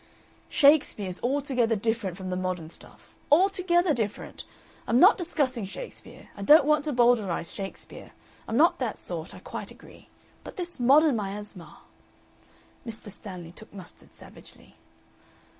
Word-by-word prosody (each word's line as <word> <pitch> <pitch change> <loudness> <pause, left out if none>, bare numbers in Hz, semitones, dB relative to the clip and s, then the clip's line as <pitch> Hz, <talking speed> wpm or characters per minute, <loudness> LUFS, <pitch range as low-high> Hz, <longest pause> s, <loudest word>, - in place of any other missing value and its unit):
'" - - -32
"Shakespeare 285 -8 +4
is 180 0 -6
altogether 255 -3 0
different 210 -4 -2
from 185 -1 -6
the - - -1
modern 180 -3 -4
stuff. - - -15 0.2
Altogether 355 0 +3
different. 215 -4 -5 0.4
I'm 235 - +3
not 380 +8 +8
discussing 285 - -1
Shakespeare. 470 - -10
I 200 - -9
don't 295 +8 +7
want 300 0 +2
to 300 - -1
Bowdlerize 235 - +1
Shakespeare. 195 -1 -9 0.4
I'm 225 - -1
not 330 +4 +4
that 245 -5 -2
sort 170 -1 -7
I - - -10
quite - - -7
agree. - - -16 0.3
But - - -11
this 350 -5 -5
modern 280 +3 +5
miasma 205 -3 -7 0.5
" - - -31
Mr. 220 -3 -5
Stanley 180 -4 -9
took 215 +5 -15
mustard 190 -4 -13
savagely. - - -16
230 Hz, 145 wpm, -27 LUFS, 195-295 Hz, 0.5 s, not